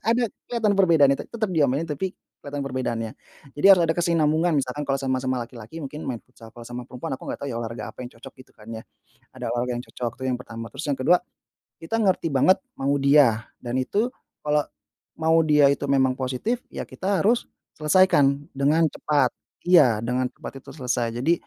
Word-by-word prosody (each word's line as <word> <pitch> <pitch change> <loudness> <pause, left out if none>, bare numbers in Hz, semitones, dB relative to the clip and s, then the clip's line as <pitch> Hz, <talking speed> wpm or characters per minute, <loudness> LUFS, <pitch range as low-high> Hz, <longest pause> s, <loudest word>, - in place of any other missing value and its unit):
ada 235 +2 +2 0.2
kelihatan 225 -4 +1
perbedaannya, 165 -8 +5
te - - -6
tetap 220 -3 -2
diomelin 145 -2 +2
tapi 165 +4 -4 0.2
kelihatan 145 0 -5
perbedaannya. 120 -4 -2 0.4
Jadi 145 +6 +1
harus 190 -3 +8
ada 165 - +2
kesinambungan, 165 -1 +2
misalkan 140 +1 -2
kalau 135 - +2
sama-sama 130 -2 -1
laki-laki 115 +3 -12
mungkin 150 +2 -6
main 120 -3 -5
futsal, 120 -3 -15
kalau 120 - -9
sama 120 +1 -7
perempuan 130 +5 -6
aku - - -9
nggak - - -4
tahu - - -3
ya, - - -4
olahraga 115 -1 -5
apa - - -13
yang 125 -1 -6
cocok 130 +3 -11
gitu - - -28
kan, 105 - -16
ya. 110 0 -6 0.5
Ada - - -5
olahraga 120 +1 -1
yang - - -10
cocok 120 -2 -4
itu 130 - -4
yang 125 - 0
pertama, 115 -1 -8
terus 135 +3 -6
yang 140 - 0
ke-2, 150 +7 +5 0.7
kita 165 +8 -2
ngerti 190 -4 +2
banget 185 +8 +5 0.2
mau 135 +1 0
dia, 140 -6 +4 0.2
dan 120 +1 -2
itu 215 - 0 0.4
kalau 150 0 +3 0.6
mau 160 0 +2
dia 150 -2 +5
itu 140 - -5
memang 130 -2 +3
positif, 130 - -1
ya - - -5
kita 195 +1 -1
harus 235 +4 +2 0.3
selesaikan 150 -3 +4
dengan 150 +4 +3
cepat. 150 +1 +1 0.4
Iya, 150 -11 +6
dengan 125 +2 0
cepat - - -8
itu - - -12
selesai, 125 -4 -1 0.2
jadi 160 +5 +3
140 Hz, 195 wpm, -24 LUFS, 125-165 Hz, 0.7 s, harus